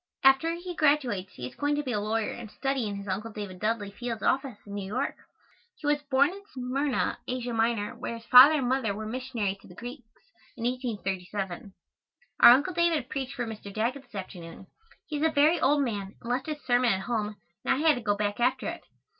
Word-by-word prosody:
After 270 +5 +5
he 350 +1 -6
graduates 260 - +1
he 125 - -7
is 125 - -7
going 290 0 0
to 295 - -1
be 260 - -3
a 210 - 0
lawyer 215 +1 -1
and 235 -3 -8
study 270 -1 -1
in 205 - -4
his 200 0 -7
Uncle 205 +4 -3
David 205 -4 -7
Dudley 215 -1 -1
Field's 230 +1 -5
office 265 -4 +1
in 200 - -9
New 200 -1 -4
York. 250 +7 -1 0.6
He - - -11
was 295 0 +2
born 280 +1 +3
in 395 +2 -9
Smyrna, 260 +2 -1
Asia 250 -1 -3
Minor, 225 -2 0
where 235 - -5
his 230 - -14
father 260 +6 +9
and 270 -5 0
mother 250 -5 0
were 215 +1 -5
missionaries 225 -4 -3
to - - -17
the 180 - -14
Greeks, 245 +1 -9 0.5
in - - -6
1837. 200 -6 -3 0.6
Our - - +10
Uncle 285 +9 +4
David 330 -6 +1
preached 275 -1 -4
for 245 -3 -2
Mr. 215 -3 -7
Daggett 235 +7 -1
this 245 -5 -18
afternoon. 180 -2 -8 0.4
He 300 - -4
is 290 - -2
a 320 - +5
very 310 +2 +3
old 285 +1 +4
man 205 -5 -4
and 235 - -5
left 255 +4 -1
his 300 -1 -5
sermon 245 -2 +3
at 190 - -2
home 215 -1 -2 0.3
and - - +2
I 305 +4 0
had 310 - +7
to 245 - -4
go 205 -2 +1
back 205 +1 -1
after 245 +2 +1
it. - - -6
245 Hz, 220 wpm, -28 LUFS, 205-275 Hz, 0.6 s, Our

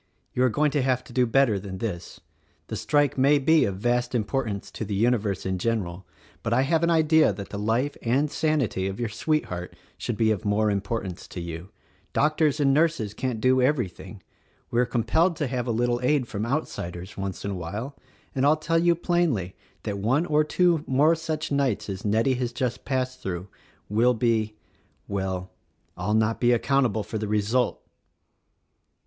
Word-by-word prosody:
you 125 - +1
are 130 - +4
going 150 +5 +1
to 145 - +1
have 130 -1 +1
to - - -14
do 125 -1 +3
better 115 -4 +3
than 95 -1 -7
this. 90 -4 -5 0.5
The - - -3
strike 145 -2 +1
may 140 +3 +5
be 155 +3 +4
of 100 - -2
vast 120 +3 0
importance 110 -3 -2
to - - -5
the 100 -1 -3
universe 110 -3 +1
in 95 -1 -1
general, 95 -5 -2 0.3
but 115 - -1
I 130 +3 +4
have 160 +3 +2
an 170 - +2
idea 160 -4 +4
that 100 0 -7
the 100 - -5
life 115 +7 0
and 135 +5 +1
sanity 140 -12 0
of 95 +3 -5
your 120 -2 -1
sweetheart 110 - -2 0.2
should 120 - -3
be 110 -1 +3
of 105 -4 -1
more 105 +1 +2
importance 100 -2 -3
to - - -7
you. 85 +1 -6 0.4
Doc 150 +1 +2
tors 155 -2 +2
and 135 -2 +4
nurses 150 -9 +1
can't 125 0 -3
do 130 +2 +3
everything. 125 - -1 0.5
We 120 - +1
are 125 - +1
compelled 160 +11 +2
to 150 - -1
have 125 -2 -2
a - - +1
little 120 +1 0
aid 130 -1 +2
from 105 +1 -3
outsiders, 95 - -4
once 95 -1 -5
in 100 - -2
a - - -3
while; 105 - -5 0.4
and 130 - 0
I'll 150 +2 +5
tell 165 +2 +1
you 170 0 +4
plainly 165 - 0 0.3
that 100 -1 -3
one 130 - +2
or 155 -2 +3
two 170 0 +2
more 145 +5 +4
such 160 -2 -3
nights 130 -7 0
as 95 0 -5
Nettie 110 +5 +2
has 125 -1 -2
just 120 -2 -3
passed 130 -1 -2
through 90 0 -4 0.4
will 120 +4 +3
be 110 -2 +1 0.3
— - - -39
well, 95 -2 -3 0.2
— - - -43
I'll 95 +5 -1
not 110 +1 +1
be 120 0 +5
account 135 +2 +2
able 110 -1 -2
for 110 +2 -4
the 105 - -3
result!" 105 +4 0
120 Hz, 195 wpm, -25 LUFS, 100-140 Hz, 0.5 s, may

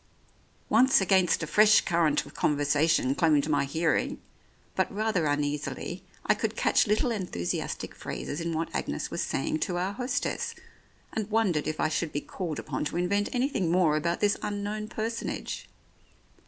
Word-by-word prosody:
Once 255 +5 +5
against 190 -3 +3
a - - 0
fresh 215 +6 +6
current 165 -5 +1
of - - -13
conversation 145 -1 +2
claimed 150 -1 +3
my 145 -2 +2
hearing, 160 +3 0 0.6
but 190 - +1
rather 205 -5 0
uneasily, 145 +4 -2 0.2
I - - +5
could 220 +1 -2
catch - - +3
little 215 +4 +2
enthusiastic 180 - -3
phrases 145 - -5
in 170 0 -2
what 165 0 -2
Agnes - - -3
was - - -2
saying 155 +3 -1
to 175 +3 -1
our 185 +3 -1
hostess, 250 +3 -2 0.6
and 215 -1 -2
wondered 205 -9 +1
if 155 - -3
I 155 - +2
should 155 0 -1
be 145 - -2
called 170 -6 -5
upon - - -3
to 160 - -3
invent 200 +4 +1
anything 245 - 0
more 170 -4 +3
about 170 +3 -1
this 205 -1 +3
unknown 210 +1 -3
personage. 225 +1 -4
175 Hz, 155 wpm, -28 LUFS, 155-210 Hz, 0.6 s, fresh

